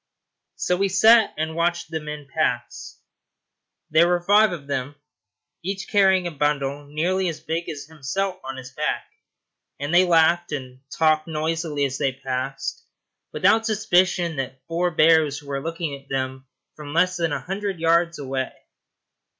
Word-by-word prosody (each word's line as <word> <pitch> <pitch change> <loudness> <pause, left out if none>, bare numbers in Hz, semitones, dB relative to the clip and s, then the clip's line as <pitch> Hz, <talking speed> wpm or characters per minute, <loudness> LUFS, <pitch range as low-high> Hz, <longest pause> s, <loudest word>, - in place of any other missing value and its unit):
So 180 - 0
we 195 +1 +1
sat 220 +3 +6
and 160 +1 -2
watched 170 0 -1
the 160 - -2
men 150 -1 -7
pass. - - -2 0.9
There 160 +2 +5
were 175 0 +1
five 210 +2 +5
of 160 -5 -6
them, 140 0 -3 0.7
each 195 +3 -4
carrying 190 -3 +4
a 175 - -2
bundle 145 -1 -1
nearly 175 +5 0
as 160 - -6
big 165 +2 -3
as 145 -3 -6
himself 180 +6 -3
on 135 0 -6
his 130 0 -9
back, - - -2 0.7
and 145 +3 -3
they 180 +1 +7
laughed 170 0 +3
and 130 -2 -6
talked 155 0 +2
noisily 160 -2 -1
as 135 -1 -3
they 135 - +1
passed, 130 +1 -4 0.5
without 225 - +3
a - - -9
suspicion 185 -6 +2
that 130 0 -5
four 170 +2 0
bears 155 -3 +3
were 140 -1 -4
looking 165 -1 -3
at 140 0 -16
them 130 0 -3 0.3
from 150 0 -8
less 185 +2 +3
than 165 -2 0
a - - -1
hundred 195 -1 -4
yards 170 +1 +2
away. 135 -2 -3
160 Hz, 160 wpm, -23 LUFS, 140-175 Hz, 0.9 s, they